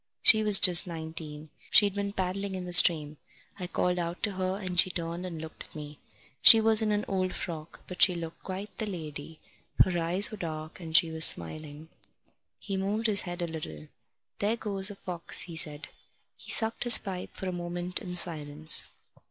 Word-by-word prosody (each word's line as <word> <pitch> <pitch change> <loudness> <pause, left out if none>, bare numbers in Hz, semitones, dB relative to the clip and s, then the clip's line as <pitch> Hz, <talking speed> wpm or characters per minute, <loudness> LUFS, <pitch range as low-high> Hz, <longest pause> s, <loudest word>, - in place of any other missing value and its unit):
She 220 - +5
was 210 -2 +7
just 180 -1 +6
nineteen. 160 -2 -9 0.2
She'd 205 -2 +5
been 200 0 -4
paddling 190 0 -4
in 185 -1 -7
the 180 - -7
stream. 155 -4 +5 0.4
I 180 - -6
called 180 0 -2
out 170 +1 -6
to 210 - +1
her, 185 0 -4
and 185 -3 -1
she 185 - +5
turned 170 +1 -6
and 165 -3 -8
looked 160 0 -9
at - - -15
me. 150 -1 -10 0.4
She 225 - +10
was 220 0 +3
in 215 -1 -1
an 210 0 -2
old 185 -1 -3
frock, 165 -3 -8
but 180 - -10
she 180 - +6
looked 165 -1 -9
quite 195 +2 -8
the 220 - -4
lady. 155 -4 -9 0.5
Her 180 -2 -3
eyes 180 +5 +2
was 215 - -10
dark, 155 -1 -8
and 160 -2 0
she 165 -1 +2
was 160 0 +3
smiling." 150 - -1 0.7
He 195 - -6
moved 205 +4 -3
his 210 -3 +4
head 175 0 -6
a - - -3
little. 80 - -9 0.5
"There 215 +3 -1
goes 200 -3 0
a 205 - -10
fox," 180 -3 -3
he 170 - -9
said. 150 -2 0 0.5
He - - -13
sucked 225 +1 +2
his 240 - +6
pipe 185 -3 -8
for 190 - -7
a - - -3
moment 175 +1 -5
in 180 -1 -8
silence. 155 -3 0
180 Hz, 195 wpm, -27 LUFS, 160-195 Hz, 0.7 s, She